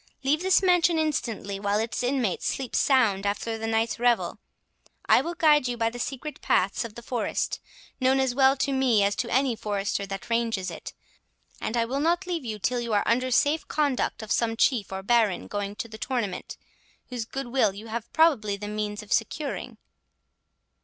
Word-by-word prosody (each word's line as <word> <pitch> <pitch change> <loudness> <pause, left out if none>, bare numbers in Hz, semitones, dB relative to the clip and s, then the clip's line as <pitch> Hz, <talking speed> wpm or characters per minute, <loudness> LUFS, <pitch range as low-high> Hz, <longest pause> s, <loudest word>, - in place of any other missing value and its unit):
Leave 295 +4 +2
this 375 +1 +3
mansion 355 -2 +4
instantly, 230 -10 -2
while 205 0 0
its 225 +3 -2
inmates 245 -6 0
sleep 265 -3 -3
sound 225 -8 +3
after 205 +3 -2
the 225 0 -4
last - - -1
night's 225 0 0
revel. 240 -1 +1 0.7
I - - +5
will 345 +1 -4
guide 300 -5 +4
you 245 -1 -3
by 230 -1 +1
the 245 - -8
secret 280 +4 -5
paths 190 +1 +1
of 225 -2 -8
the 235 - -9
forest, 240 -1 -2 0.4
known 260 +1 +3
as 265 -2 +1
well 270 +1 +4
to 280 - 0
me 255 -6 +3
as 200 +1 +1
to 240 - -2
any 260 -1 +2
forester 200 -2 -2
that 195 0 -6
ranges 230 -5 -1
it, - - -8 0.7
and 230 - -2
I 230 - +2
will 265 +4 -2
not 345 +5 +1
leave 345 -4 -3
you 220 -3 -4
till 245 +4 0
you 235 -2 -3
are 205 - +3
under 255 +3 +1
safe 290 +5 +2
conduct 285 -6 0
of 215 - -7
some 225 -1 +1
chief 230 -6 +2
or 190 0 -5
baron 220 -3 +2
going 205 0 -4
to 235 +2 -5
the 220 -1 -11
tournament, 230 -8 -3 0.5
whose 245 -3 -4
good 270 +1 -5
will 240 -5 +3
you 210 +3 -9
have 235 0 -5
probably 255 -11 +3
the 205 +1 -6
means 210 0 -3
of 210 - -2
securing." 275 +6 -2
235 Hz, 195 wpm, -26 LUFS, 210-270 Hz, 0.7 s, I